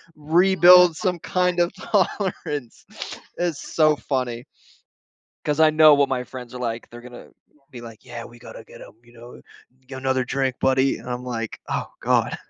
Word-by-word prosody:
rebuild 175 +2 +5
some 180 -4 -2
kind 180 0 -1
of 175 +2 +1
tolerance. 185 - -2 0.5
It's 170 -5 -2
so 155 -1 +4
funny 125 -4 -3 1.0
'cause 150 +1 -1
I 155 -1 +6
know 155 0 +6
what 140 -1 +2
my 125 -1 -2
friends 125 -1 -10
are - - -7
like. 115 -1 -4
They're 120 0 -12
gonna 125 0 -12 0.4
be 125 - -11
like, 115 -1 -12
"Yeah. 120 -2 -8
We 120 0 -15
gotta 115 - -11
get - - -15
him," - - -13
you 120 0 -21
know, 120 +1 -14 0.5
"Get 130 -1 -8
another 130 -1 0
drink, 130 0 -1
buddy." 135 0 +2
And - - -13
I'm 125 0 -4
like, 115 -3 -5
"Oh - - -2
god." - - +1
135 Hz, 175 wpm, -22 LUFS, 120-160 Hz, 1.0 s, I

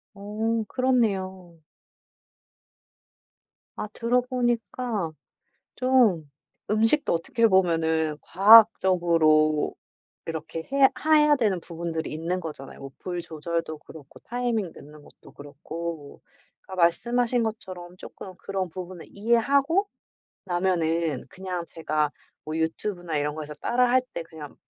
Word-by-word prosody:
어 220 +3 -2
그렇네요. 195 -9 0 2.2
아 215 - -4
들어보니까 240 -5 -1 0.6
좀 235 - +3 0.4
음식도 225 +8 +3
어떻게 225 +8 +2
보면은 160 -5 +2
과학적으로 170 -7 +5 0.5
이렇게 160 0 -6
해야 275 -1 +6 0.2
하야 300 -1 +5
되는 205 -7 +1
부분들이 165 -1 -5
있는 165 +4 -2
거잖아요. 150 -5 -8
뭐 135 0 -9
불 175 -1 -4
조절도 165 0 -4
그렇고 150 -2 -14
타이밍 235 -6 -2
넣는 150 +1 -13
것도 - - -18
그렇고 155 +1 -8 0.4
그러니까 185 -2 -1
말씀하신 240 +7 +2
것처럼 185 -5 -6
조금 185 -1 -10
그런 195 -1 -3
부분을 180 0 -8
이해하고 275 - +2 0.6
나면은 170 -5 0
그냥 185 +1 -5
제가 155 -1 -1 0.3
뭐 155 - -4
유튜브나 165 +1 -2
이런 145 0 -1
거에서 150 -1 -7
따라 245 +9 +1
할 255 +1 +4
때 - - -3
그냥 160 -3 -11
180 Hz, 260 characters per minute, -25 LUFS, 160-230 Hz, 2.2 s, 해야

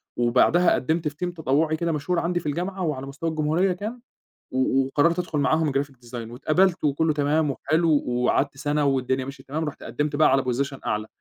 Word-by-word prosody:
وبعدها 125 +9 +3
قدمت 160 +3 0
في 150 - -4
team 175 - -4
تطوعي 155 0 +1
كده 170 0 -1
مشهور 165 +4 -1
عندي 175 +1 0
في 155 - -14
الجامعة 180 +6 -3
وعلى 135 -4 -2
مستوى 140 +4 -4
الجمهورية 160 +4 +1
كان 215 +7 -6 0.5
و 130 +1 +2
وقررت 165 +6 +2
أدخل 165 -4 -2
معاهم 155 +1 +2
Graphic 140 0 -2
design، 115 -1 -7
واتقبلت 170 +8 +1
وكُلّه 150 +2 +2
تمام 150 0 +1
وحلو 160 +4 0 0.2
وقعدت 125 +3 +1
سنة 145 +1 0
والدنيا 130 -1 0
ماشية 135 -1 -9
تمام 155 +4 -3
رُحت 150 - -6
قدمت 150 -1 -2
بقى 155 -2 +4
على 135 0 +3
Position 135 +2 -2
أعلى، 105 +1 -1
150 Hz, 185 wpm, -24 LUFS, 135-165 Hz, 0.5 s, بقى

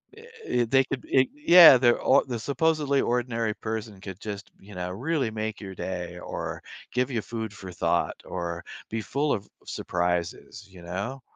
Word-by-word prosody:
Eh 450 - -14 0.2
eh 120 - +1
they 135 +3 +4
could 135 -3 -5
eh 130 -1 +5
yeah, 175 - +9
they're 120 -1 +4
or 135 - +4
the 120 -4 -4
supposedly 140 +2 +1
ordinary 115 -2 0
person 110 -2 -5
could 95 0 -8
just, 100 -1 -6
you 100 +1 -14
know, 90 0 -4
really 130 - -1
make 110 0 -4
your 95 -2 -8
day 90 -1 -5
or - - -5 0.3
give 125 +2 0
you 115 -3 -1
food 110 -1 -5
for 95 -3 -9
thought - - 0
or 85 0 -4 0.3
be 110 0 -2
full 145 +6 0
of 100 -1 -4 0.2
surprises, 90 +2 -2
you 90 -2 -14
know? 100 +10 -5
110 Hz, 175 wpm, -26 LUFS, 95-130 Hz, 0.3 s, yeah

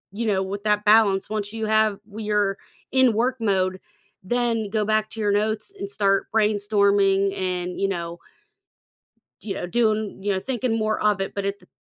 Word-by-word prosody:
you 230 0 -2
know, 190 -2 +1
with 200 +2 -5
that 210 -1 +1
balance, 210 -3 +4
once 210 -1 -3
you 220 -1 -3
have 215 -1 +2
w 215 0 -8
you're 205 -2 +1 0.4
in 260 -3 +4
work 245 +4 0
mode, 190 -3 0 0.4
then 230 +1 0
go 215 0 0
back 215 0 +1
to 225 - -9
your 205 -1 +1
notes 215 - -1
and 400 +1 -4
start 195 - +1
brainstorming 200 -2 +2
and, 180 -1 -3
you 195 - +1
know 170 -2 -4 1.2
you 195 - -4
know, 175 - -4
doing 215 -1 0
you 200 0 0
know, 190 - -1
thinking 245 -1 -2
more 215 0 -1
of 210 -2 +2
it. 195 - -4
But 200 - -2
at 200 0 -2
th - - -23
210 Hz, 190 wpm, -23 LUFS, 195-220 Hz, 1.2 s, balance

